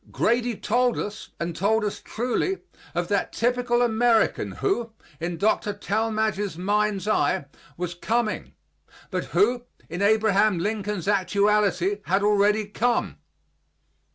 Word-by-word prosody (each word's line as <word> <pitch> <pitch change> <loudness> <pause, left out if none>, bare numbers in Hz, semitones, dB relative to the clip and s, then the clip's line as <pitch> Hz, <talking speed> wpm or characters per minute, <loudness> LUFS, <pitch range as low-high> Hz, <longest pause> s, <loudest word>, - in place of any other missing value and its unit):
Grady 240 0 +1
told 245 +2 +1
us, 210 +1 -5
and 170 0 -3
told 210 +4 +1
us 205 - -4
truly, 250 - -1 0.4
of 175 0 0
that 200 -1 0
typical 245 0 +1
American 230 -1 +2
who, 240 - -1 0.3
in 170 +1 -3
Dr. 205 +1 +1
Talmage's 215 -2 -1
mind's 205 +2 0
eye, 145 -9 +1 0.3
was 175 0 -3
coming, 220 +5 -2 0.6
but - - -2
who, 245 - +1 0.2
in 175 +4 -4
Abraham 215 -1 +3
Lincoln's 205 -1 -2
actuality, 200 0 +2
had 195 +3 +1
already 210 +1 +3
come. 235 +4 -1
210 Hz, 120 wpm, -25 LUFS, 195-225 Hz, 0.6 s, Abraham